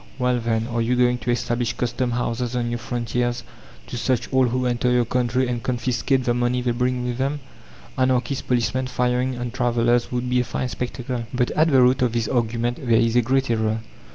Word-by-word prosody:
Well, 125 -1 +1
then 115 -1 0
are 120 0 -2
you 120 +2 +1
going 125 0 +2
to 120 - -5
establish 120 -1 0
custom 125 +1 -1
houses 120 0 -2
on 120 -1 -1
your 120 - -2
frontiers 120 0 -2 0.4
to 120 - -6
search 125 0 -1
all 130 -1 +4
who 125 +1 -1
enter 125 0 +1
your 125 -1 +3
country 125 +2 0
and 120 -1 -2
confiscate 125 +2 0
the 120 - +1
money 120 +1 +1
they 120 - +1
bring 125 +1 -1
with 125 0 -3
them? 140 +3 -1 0.6
Anarchist 130 +1 0
policemen 130 +1 0
firing 125 0 0
on 120 -1 -4
travellers 120 -1 +1
would 125 0 -2
be 125 0 +2
a - - +2
fine 125 +1 -3
spectacle!" 125 -1 -4
But 125 -1 0
at 155 +1 +3
the 135 -3 +5
root 125 +1 +3
of 125 -3 +2
this 115 -2 0
argument 120 0 0
there 120 -4 +3
is 115 0 +2
a 120 - +6
great 130 +1 +1
error. 110 -1 0
125 Hz, 210 wpm, -23 LUFS, 120-125 Hz, 0.6 s, a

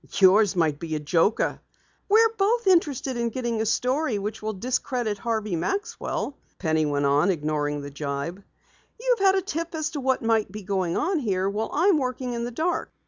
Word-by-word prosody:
"Yours 200 +1 +5
might 155 -4 +1
be 160 -2 -4
a - - -1
joker!" 165 +7 +1 0.5
"We're 450 +2 +5
both 450 +4 +1
interested 290 -8 +2
in 235 0 0
getting 235 -2 -2
a 220 - -1
story 255 +1 +1
which 210 +2 -4
will 215 0 -3
discredit 240 0 -2
Harvey 220 -5 -1
Maxwell," 285 - -3 0.2
Penny 160 -3 +1
went 145 -1 0
on, 140 +6 +3
ignoring 150 -3 -1
the 140 0 -7
jibe. 140 +6 -4 0.6
"You've - - +1
had 390 -1 +5
a 385 - +1
tip 335 -2 -4
as 315 0 -2
to 295 - -4
what 260 -1 +1
may 225 -1 +2
be 210 +2 -9
going 185 -3 -1
on 345 +2 +1
here, 195 -7 0
while 210 +3 -2
I'm 345 +1 +3
working 255 -1 -3
in 235 0 -2
the - - -3
dark. 320 +9 -2
225 Hz, 190 wpm, -25 LUFS, 180-295 Hz, 0.6 s, Yours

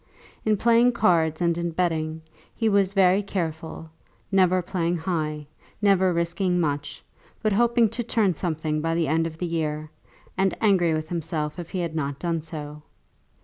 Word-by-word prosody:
In 215 -1 +3
playing 235 +3 +4
cards 170 -8 +2
and 170 -1 +2
in 170 0 -1
betting 160 -2 -1 0.3
he 225 - 0
was 200 -1 +2
very 190 0 +4
careful, 160 -4 -5 0.4
never 185 -2 +3
playing 175 -1 -1
high, 155 -3 -2 0.3
never 195 -3 +3
risking 175 +2 0
much, 145 -3 -2 0.4
but 215 -2 +2
hoping 235 +2 +4
to 230 +3 -4
turn 220 -4 +1
something 155 -2 -2
by 165 +1 0
the 165 -2 +1
end 165 +3 +1
of 160 -1 -9
the 180 - -3
year, 155 -2 -3 0.4
and 190 0 +1
angry 180 -6 +3
with 155 0 -4
himself 160 -2 -3
if 170 - -7
he 185 - -3
had 170 -2 -3
not 140 -3 -2
done 165 -1 -2
so. 150 -2 -7
170 Hz, 165 wpm, -25 LUFS, 160-190 Hz, 0.4 s, playing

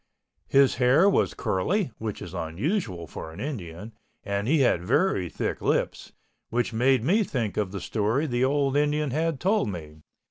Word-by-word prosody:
His 135 -2 +4
hair 130 +9 +5
was 200 - +2
curly 175 - 0
(which 110 -2 -4
is 90 - -9
unusual 90 - -2
for 80 0 -8
an 80 - -11
Indian) 105 - -6 0.3
and 100 +1 -2
he 150 +1 +3
had 120 -9 +3
very 95 - +1
thick - - -3
lips, - - -1 0.4
which 120 0 -1
made 125 +1 +3
me 190 - +3
think 115 - -2
of 100 -3 -1
the 100 - -4
story 110 +10 0
the 125 -3 0
old 140 0 +1
Indian 150 -1 +1
had 160 0 -1
told 195 - +1
me. 80 -4 -8
125 Hz, 170 wpm, -26 LUFS, 100-150 Hz, 0.4 s, hair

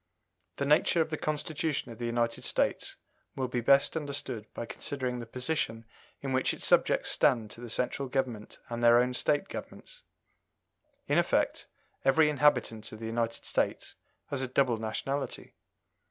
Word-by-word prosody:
The 140 - -2
nature 150 +3 +4
of 160 0 +1
the - - 0
Constitution 155 -3 -2
of 115 - -11
the 120 - -2
United 115 0 0
States - - 0 0.4
will 130 -1 -1
be 125 -1 -2
best 140 +5 +4
understood 140 -7 -4
by 115 - -4
considering 125 0 -3
the 120 - -7
position 125 -3 -2 0.4
in 135 -1 -3
which 130 0 +1
its - - -5
subjects - - +3
stand 110 -4 +2
to 115 - -10
the 120 - -7
Central 125 +4 -1
Government 125 -5 -2
and 120 -1 -4
their 120 0 +7
own 125 +1 +1
State 145 +4 +1
Governments. - - -9 1.0
In - - +3
effect, - - +1 0.4
every 150 +2 +5
inhabitant 130 -6 +2
of 110 - -8
the 110 - -7
United 115 0 -2
States - - -1 0.4
has 140 -2 0
a 130 - -1
double 125 -2 +2
nationality. 135 +6 -3
125 Hz, 160 wpm, -30 LUFS, 115-140 Hz, 1.0 s, their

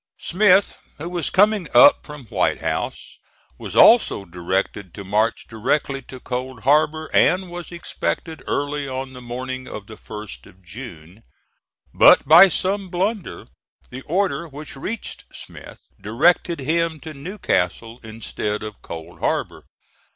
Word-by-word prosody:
Smith, 195 +1 +3 0.2
who 160 - -6
was 175 -1 -2
coming 205 -2 +3
up 125 +4 +7
from 150 -3 -10
White - - 0
House, - - -4 0.4
was - - -7
also 100 - +5
directed 90 +2 -3
to 100 - -7
march 105 +4 0
directly 135 +5 -1
to 130 - -11
Cold 125 -1 -5
Harbor, 155 +3 +2
and 185 -1 +3
was 175 0 -8
expected 165 -2 -4
early 145 0 -2
on 130 0 -5
the 125 - -10
morning 130 +2 -6
of 105 - -8
the 110 - -11
1st 105 - -10
of 95 +1 -20
June; 90 -2 -11 0.7
but - - +6
by 170 +6 +9
some 190 +2 -1
blunder 190 +3 -3 0.4
the 130 +1 -7
order 180 0 0
which 150 0 -10
reached 210 +11 -6
Smith - - -11 0.2
directed 155 - +2
him 160 +2 0
to 155 +2 -9
Newcastle 125 - -2
instead 110 -1 -5
of 105 -1 -8
Cold 80 -1 -9
Harbor. - - -2
135 Hz, 135 wpm, -21 LUFS, 110-170 Hz, 0.7 s, by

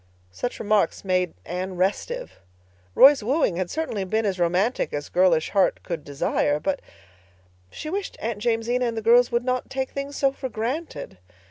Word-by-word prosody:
Such 245 - -4
remarks 210 -2 +1
made 185 -2 0
Anne 185 +2 -4
restive. 480 - -2 0.6
Roy's 280 -1 +8
wooing 240 - +1
had 185 -1 -2
certainly 310 -11 -2
been 220 +4 0
as 190 -3 -1
romantic 180 +8 +1
as 145 0 -4
girlish 175 -3 +3
heart 195 -2 +2
could 170 -4 -4
desire, 145 +1 0
but—she 90 - -8
wished 390 +5 -4
Aunt 225 -2 -3
Jamesina 240 +1 +1
and 230 -1 -3
the 220 - -3
girls 240 +2 +5
would 240 +1 0
not 255 -1 -1
take 265 0 -3
things 280 0 -5
so 275 -1 +3
for 270 -1 -6
granted. 230 - -4
215 Hz, 160 wpm, -24 LUFS, 175-255 Hz, 0.6 s, Roy's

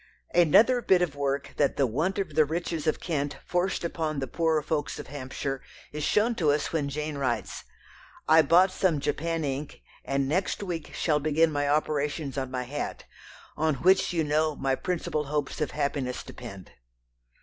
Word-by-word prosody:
Another 210 - +5
bit 185 -5 +4
of 155 -5 -2
work 140 0 -2
that 145 -2 +2
the 140 - +4
want 155 - -1
of 190 -6 -2
the 155 +1 +5
riches 165 +1 -3
of 155 - +1
Kent 145 -4 -2
forced 180 +1 0
upon 160 -3 -2
the 135 - -1
poorer 160 +3 +1
folks 155 -1 -2
of - - -7
Hampshire 135 0 -5 0.3
is 150 0 -4
shown 220 +8 +2
to 165 -9 +1
us 145 +3 0
when 145 -3 0
Jane 150 0 -4
writes: 130 -4 -2 0.6
"I 160 +1 +7
bought 175 +5 +5
some 185 -5 +1
Japan 165 +3 -1
ink 140 - -5 0.2
and 135 0 0
next 185 +7 0
week 170 -5 -5
shall 150 -3 +1
begin 155 +2 +2
my 145 -1 0
operations 145 -1 0
on 135 -2 -2
my 130 -1 -3
hat, 145 +4 -5 0.5
on 155 -1 +1
which 185 +9 +3
you 165 -2 +1
know 155 +1 +1
my 135 -1 0
principal 165 -1 -2
hopes 145 0 -2
of 150 - 0
happiness 140 -3 -2
depend." 100 -6 -10
150 Hz, 175 wpm, -27 LUFS, 140-165 Hz, 0.6 s, I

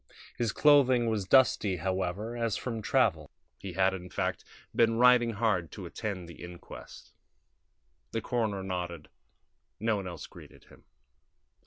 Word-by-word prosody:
His 115 -3 -1
clothing 130 -6 +4
was 105 -3 -1
dusty, 105 -6 +4
however, 95 +5 -3
as 115 -2 -1
from 115 -3 -4
travel. - - +1 0.3
He 95 -2 -7
had, 95 +1 +2
in 90 -1 -7
fact, - - -2 0.3
been 115 -1 +3
riding 120 -1 +5
hard 100 -7 0
to - - -8
attend 95 -5 -5
the 85 0 -11
inquest. 85 0 -11 1.0
The 115 - -1
coroner 110 -5 -2
nodded; 90 -4 -5 0.7
no 110 0 +1
one 95 -2 -5
else 90 - -7
greeted - - -15
him. - - -20
105 Hz, 140 wpm, -29 LUFS, 90-115 Hz, 1.0 s, riding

